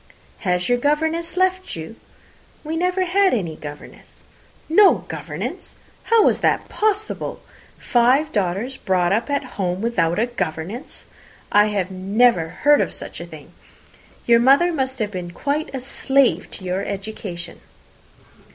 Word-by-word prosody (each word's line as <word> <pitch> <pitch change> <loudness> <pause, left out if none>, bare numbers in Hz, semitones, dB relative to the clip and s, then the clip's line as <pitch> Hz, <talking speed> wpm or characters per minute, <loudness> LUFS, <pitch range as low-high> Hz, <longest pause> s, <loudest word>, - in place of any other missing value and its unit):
"Has 180 -3 0
your 245 0 +2
governess 320 +5 0
left 370 0 +1
you?" 160 +7 -8 0.7
"We 315 +1 -4
never 365 +2 +1
had 380 -2 +3
any 170 -8 -3
governess." 145 -1 -11 0.4
"No 385 +5 +5
governess! - - -6 0.3
How 460 -2 +5
was - - +3
that - - +1
possible? 425 0 -1 0.4
Five 260 +5 +2
daughters 205 - -1
brought 180 -3 +1
up 225 +7 0
at 285 0 0
home 190 -8 -3
without 180 -7 0
a 225 - +2
governess! 235 - -5 0.5
I 205 -2 +3
never 190 -1 +2
heard 290 - +3
of - - -2
such - - -8
a - - -7
thing. - - -12 0.7
Your 235 -1 +5
mother 280 +8 +4
must 265 -3 -2
have 215 -3 -2
been 180 -3 -5
quite 290 - -2
a 270 - -4
slave 270 0 +1
to - - -8
your 185 +1 -2
education." 195 -4 -6
240 Hz, 140 wpm, -21 LUFS, 185-300 Hz, 0.7 s, No